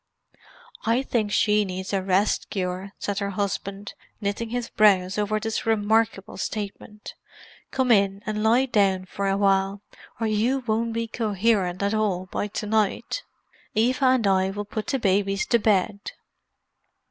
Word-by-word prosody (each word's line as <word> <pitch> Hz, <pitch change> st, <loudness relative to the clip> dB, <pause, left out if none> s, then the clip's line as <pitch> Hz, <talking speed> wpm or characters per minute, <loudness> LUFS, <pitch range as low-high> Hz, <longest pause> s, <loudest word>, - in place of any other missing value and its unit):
"I 230 Hz, +4 st, +2 dB
think 220 Hz, -6 st, -1 dB
she 210 Hz, 0 st, +3 dB
needs 190 Hz, 0 st, -5 dB
a 195 Hz, -, +1 dB
rest 190 Hz, +2 st, +1 dB
cure!" 185 Hz, 0 st, -3 dB
said 205 Hz, -1 st, -3 dB
her 200 Hz, -1 st, -2 dB
husband, 200 Hz, 0 st, -3 dB, 0.3 s
knitting 210 Hz, +2 st, -2 dB
his 245 Hz, 0 st, -3 dB
brows 195 Hz, -2 st, +3 dB
over 210 Hz, +1 st, 0 dB
this 225 Hz, +1 st, -3 dB
remarkable 220 Hz, -2 st, +1 dB
statement. 210 Hz, 0 st, -6 dB, 0.6 s
"Come 260 Hz, -2 st, +1 dB
in 200 Hz, -2 st, +3 dB
and 215 Hz, -1 st, -2 dB
lie 235 Hz, +4 st, +4 dB
down 195 Hz, -6 st, +2 dB
for 195 Hz, +2 st, -3 dB
awhile, 195 Hz, 0 st, +1 dB, 0.4 s
or 225 Hz, -, 0 dB
you 230 Hz, +5 st, +1 dB
won't 225 Hz, +1 st, 0 dB
be 230 Hz, 0 st, -2 dB
coherent 205 Hz, -4 st, 0 dB
at 200 Hz, +1 st, +1 dB
all 200 Hz, -4 st, 0 dB
by 205 Hz, -, -2 dB
to 210 Hz, +1 st, -5 dB
night; 215 Hz, -, 0 dB, 0.5 s
Eva 255 Hz, +5 st, +2 dB
and 255 Hz, -3 st, +3 dB
I 190 Hz, -1 st, +3 dB
will 205 Hz, +1 st, -4 dB
put 215 Hz, +1 st, -5 dB
the 270 Hz, -, 0 dB
babies 195 Hz, -3 st, +1 dB
to 235 Hz, -, +3 dB
bed." 200 Hz, -1 st, +1 dB
205 Hz, 150 wpm, -25 LUFS, 195-225 Hz, 0.6 s, lie